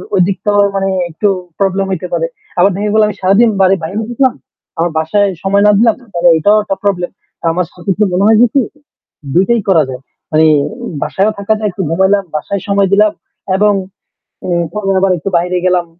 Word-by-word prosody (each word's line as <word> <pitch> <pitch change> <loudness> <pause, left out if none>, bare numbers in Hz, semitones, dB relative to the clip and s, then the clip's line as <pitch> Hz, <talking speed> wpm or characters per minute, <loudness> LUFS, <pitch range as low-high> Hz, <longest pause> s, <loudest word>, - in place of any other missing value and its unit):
ঐদিকটাও 200 +2 +1 0.2
মানে 195 0 0 0.2
একটু 175 +6 -1 0.3
প্রবলেম 195 0 0
হইতে 180 -1 -3
পারে। - - 0 0.3
আবার 195 +3 +4
দেখা 205 +2 -2
গেলো 220 0 +4
আমি 210 - -4
সারাদিন 200 +5 +4
বাড়ির 190 0 +3
বাইরে 185 +6 -4
থাকলাম, 260 +1 +1 0.4
আমার 170 +1 0
বাসায় 200 +6 +1 0.2
সময় 200 +1 +2
না 210 - +6
দিলাম, 230 -1 +3 0.2
তাহলে 175 0 +3
এটাও 205 +7 +3
একটা 195 - -2
প্রবলেম। 180 -3 -1 0.4
আমার 180 +1 -1
সাথে 180 +2 -9
কি 215 - +2
মনে 180 +2 +1
হয় 220 0 +5
যে - - +7
কি 275 - +3 0.7
২ 180 - +4
টাই 235 -2 +2
করা 165 -5 +4
যায়। 130 0 -7 0.3
মানে 155 +1 +4 0.6
বাসায়ও 200 +3 0
থাকা 200 +2 +1
যায়, 215 -1 -1
একটু 190 +2 -5
ঘুমাইলাম, 190 +4 +2
বাসায় 195 +6 -3
সময় 200 -1 +2
দিলাম 210 +1 +4 0.4
এবং 205 +1 +3 0.7
এ - - -4 0.3
পরে 210 -2 -3
আবার 195 0 +2
একটু 180 - -4
বাইরে 180 +1 -1
গেলাম। 180 -1 +2
195 Hz, 190 wpm, -13 LUFS, 180-210 Hz, 0.7 s, যে